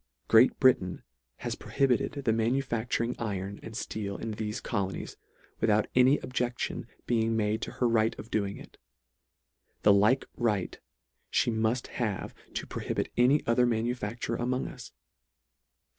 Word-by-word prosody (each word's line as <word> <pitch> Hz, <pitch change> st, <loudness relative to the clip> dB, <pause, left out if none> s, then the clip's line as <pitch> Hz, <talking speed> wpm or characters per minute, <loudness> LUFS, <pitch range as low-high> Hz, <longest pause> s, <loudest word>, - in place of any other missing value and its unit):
Great 115 Hz, +3 st, +6 dB
Britain 105 Hz, -9 st, +3 dB, 0.3 s
has -, -, -4 dB
prohibited 135 Hz, -3 st, +1 dB
the 110 Hz, -, +3 dB
manu 115 Hz, +5 st, +1 dB
facturing 115 Hz, 0 st, -1 dB
iron 100 Hz, -3 st, -3 dB
and 110 Hz, -1 st, -9 dB
fteel 100 Hz, -2 st, -4 dB
in 110 Hz, -1 st, -4 dB
thefe 105 Hz, +2 st, -4 dB
colonies, 95 Hz, -1 st, -3 dB, 0.4 s
without 110 Hz, -1 st, +3 dB
any 130 Hz, +3 st, +5 dB
objection 125 Hz, -1 st, -2 dB, 0.2 s
being 115 Hz, -1 st, +1 dB
made 110 Hz, +1 st, 0 dB
to -, -, -5 dB
her 125 Hz, -, +1 dB
right 115 Hz, -1 st, +2 dB
of 115 Hz, -, -10 dB
doing 100 Hz, -2 st, -1 dB
it. -, -, -14 dB, 1.0 s
The 105 Hz, -, +7 dB
like 105 Hz, +7 st, +4 dB
right 105 Hz, -6 st, -1 dB, 0.5 s
fhe 120 Hz, -, +2 dB
murt 110 Hz, +3 st, +1 dB
have 110 Hz, -6 st, -3 dB, 0.2 s
to -, -, -2 dB
prohibit -, -, -3 dB
any 130 Hz, +5 st, +4 dB
other 120 Hz, +1 st, +3 dB
manufacture 115 Hz, 0 st, -2 dB
a 120 Hz, -, -2 dB
mong 130 Hz, +1 st, -1 dB
us. -, -, -11 dB
115 Hz, 145 wpm, -29 LUFS, 105-125 Hz, 1.0 s, The